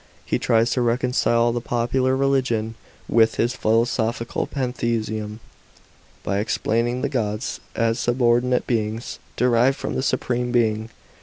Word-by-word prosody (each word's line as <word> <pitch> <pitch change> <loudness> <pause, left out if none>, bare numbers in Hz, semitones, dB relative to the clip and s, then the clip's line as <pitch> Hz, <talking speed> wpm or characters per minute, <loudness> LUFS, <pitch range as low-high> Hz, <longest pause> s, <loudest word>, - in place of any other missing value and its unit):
He - - 0
tries 115 0 +2
to 125 - +1
reconcile 120 -1 +2
the 120 0 -2
popular 125 +2 0
religion 130 -5 +1 0.3
with 115 -1 +3
his 120 +2 0
philosophical 115 +1 0
pantheism, 115 -5 -2 0.8
by 100 - -1
explaining 115 +3 0
the - - +2
gods 110 -3 -2 0.2
as 115 0 +1
subordinate 120 0 +2
beings, 110 0 -2 0.2
derived 125 +2 +3
from - - -4
the - - -1
Supreme 125 -2 -1
Being. 110 -2 +1
120 Hz, 125 wpm, -23 LUFS, 115-125 Hz, 0.8 s, with